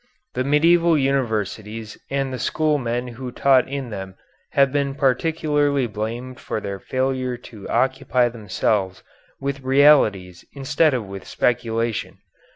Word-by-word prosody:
The 130 - -1
medieval 165 +4 +4
universities 110 -5 -2
and 135 -1 -1
the 130 - -4
school 155 +4 +1
men 120 0 -2
who 125 +1 -7
taught 130 0 +3
in 135 -3 -5
them 95 -2 -6 0.4
have 140 -1 +4
been 140 -1 -1
particularly 145 0 +1
blamed 120 +3 -5
for - - -3
their 100 -2 -5
failure 130 +1 -1 0.2
to 105 -3 -9
occupy 130 -1 +2
themselves 105 -4 -1 0.4
with 140 0 -3
realities 130 -10 +4
instead 145 +2 +2
of 120 -4 -3
with 95 0 -9
speculation. 115 -2 -1
130 Hz, 130 wpm, -22 LUFS, 110-140 Hz, 0.4 s, medieval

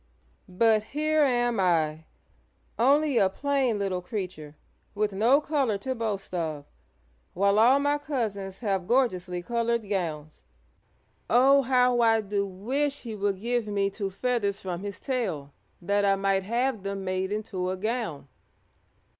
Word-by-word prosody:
"But 215 +3 +3
here 305 +7 0
am 240 -5 +2
I, 160 -4 +1 0.7
only 280 +2 +3
a 190 - +4
plain 270 0 0
little 195 -3 -2
creature, 180 -7 -6 0.4
with 210 0 0
no 235 +8 +4
color 280 -8 0
to 260 +6 -3
boast 215 -6 -4
of, 155 -5 -3 0.7
while 200 +2 +3
all 245 +5 +6
my 290 +1 +1
cousins 210 -10 -4
have 195 -5 -1
gorgeously 185 -8 0
colored 235 0 -1
gowns. 155 - -4 0.9
Oh, 270 +4 +5
how 250 -1 +3
I 225 -1 +4
do 200 -1 -2
wish 270 +10 -2
he 230 -3 -6
would 200 -2 -1
give 235 +1 -1
me 200 -1 0
two 195 -1 -4
feathers 205 -1 -1
from 180 -2 -5
his 200 -1 -6
tail 185 - -3 0.3
that 200 +3 +1
I 195 -1 +4
might 195 0 +1
have 235 +3 -1
them 195 0 -4
made 185 +1 -2
into 205 -4 -3
a 185 - -2
gown!" 215 - -3
205 Hz, 145 wpm, -27 LUFS, 190-245 Hz, 0.9 s, all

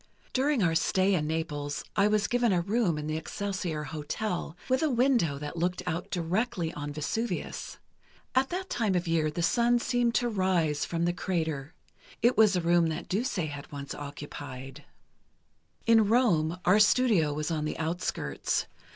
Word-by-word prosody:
"During 265 -3 +2
our 165 -2 +3
stay 190 +4 +2
in 155 -5 +1
Naples, 150 -2 -3
I 200 0 +4
was 210 0 +2
given 245 -2 +2
a 180 - +3
room 195 -2 +1
in 150 - -4
the 155 +1 -2
Excelsior 180 -3 -3
Hotel, 160 +4 -4
with 260 0 +2
a 315 - +2
window 240 - +2
that 150 +3 -6
looked 180 +2 -1
out 180 0 -3
directly 175 0 -1
on 145 0 -5
Vesuvius. 220 +11 -3 0.6
At 260 +1 +2
that 370 +2 -3
time 215 - 0
of 175 0 0
year, 160 -2 +2
the 165 +3 -3
sun 235 +6 +3
seemed 240 -1 +1
to 245 - +2
rise 185 -8 +1
from 170 0 -1
the 175 - +1
crater. 160 -5 -2 0.5
It 240 +2 +5
was 215 -3 +5
a 180 - +1
room 170 0 +3
that 160 +2 -4
Duse 235 +9 -1
had 150 -6 -4
once 140 -1 -6
occupied. 140 -2 -8 1.0
"In 225 -2 +5
Rome, 180 -9 +3
our 190 +4 +5
studio 210 -8 +4
was 150 +3 -2
on 155 -2 -1
the 155 - -3
outskirts. 165 +3 -2
175 Hz, 170 wpm, -29 LUFS, 155-220 Hz, 1.0 s, It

